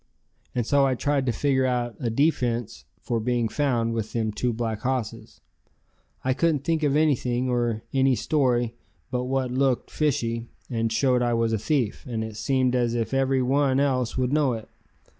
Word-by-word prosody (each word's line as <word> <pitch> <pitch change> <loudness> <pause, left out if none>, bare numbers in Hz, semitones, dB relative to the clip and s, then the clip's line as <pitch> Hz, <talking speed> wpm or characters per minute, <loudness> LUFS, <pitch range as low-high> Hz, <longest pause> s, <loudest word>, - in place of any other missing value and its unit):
And 120 -2 0
so 140 +3 +3
I 135 -1 +2
tried 140 0 0
to - - +3
figure 130 +1 +1
out 120 -2 -1
a 120 - -1
defense 120 -3 0 0.2
for 120 -2 -1
being 120 0 0
found 115 -2 0
with 110 -2 -3
them 110 -2 0
two 120 +4 -1
black 110 -2 -3
hosses. 125 -2 -4 0.8
I 130 - +2
couldn't 150 -1 +1
think 165 0 0
of 145 -2 +2
anything 130 -5 +1
or 120 -2 0
any 135 -1 +3
story 120 -2 +1 0.4
but 125 -1 -1
what 130 -1 -1
looked 130 -1 0
fishy 120 -6 -1 0.2
and 115 -1 0
showed 125 +2 +2
I 120 -1 +1
was 115 -1 +1
a 110 - 0
thief, 125 -3 -1
and 110 -2 -2
it 110 -1 -6
seemed 130 +1 +1
as 120 -1 +1
if 115 +2 -2
every 135 -1 +2
one 135 +1 +2
else 130 -4 0
would 130 +1 0
know 145 -4 +3
it. 110 -1 -7
125 Hz, 180 wpm, -25 LUFS, 115-135 Hz, 0.8 s, so